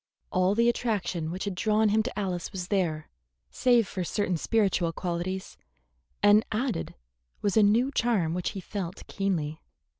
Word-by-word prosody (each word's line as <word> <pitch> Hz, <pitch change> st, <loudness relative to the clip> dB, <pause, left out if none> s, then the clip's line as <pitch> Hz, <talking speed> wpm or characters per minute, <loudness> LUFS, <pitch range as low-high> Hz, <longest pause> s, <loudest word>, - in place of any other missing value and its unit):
All 185 Hz, 0 st, +2 dB
the 235 Hz, +1 st, +3 dB
attraction 205 Hz, -9 st, -1 dB
which 180 Hz, +3 st, -4 dB
had 200 Hz, -, -2 dB
drawn 215 Hz, +3 st, +2 dB
him 215 Hz, +2 st, +3 dB
to 235 Hz, +1 st, -5 dB
Alice 185 Hz, -4 st, -2 dB
was 185 Hz, -3 st, -5 dB
there, 165 Hz, -6 st, 0 dB, 0.4 s
save 240 Hz, -4 st, +3 dB
for 185 Hz, -, -3 dB
certain 185 Hz, +1 st, -1 dB
spiritual 190 Hz, -2 st, +1 dB
qualities, 180 Hz, +2 st, -4 dB, 0.6 s
and 205 Hz, +1 st, +6 dB
added 225 Hz, -4 st, -2 dB, 0.5 s
was 205 Hz, -, +1 dB
a 220 Hz, -, +6 dB
new 225 Hz, +6 st, +4 dB
charm 220 Hz, -, +1 dB
which 180 Hz, 0 st, -1 dB
he -, -, -4 dB
felt 185 Hz, -1 st, -6 dB
keenly. 165 Hz, -6 st, -2 dB
195 Hz, 155 wpm, -28 LUFS, 175-215 Hz, 0.6 s, and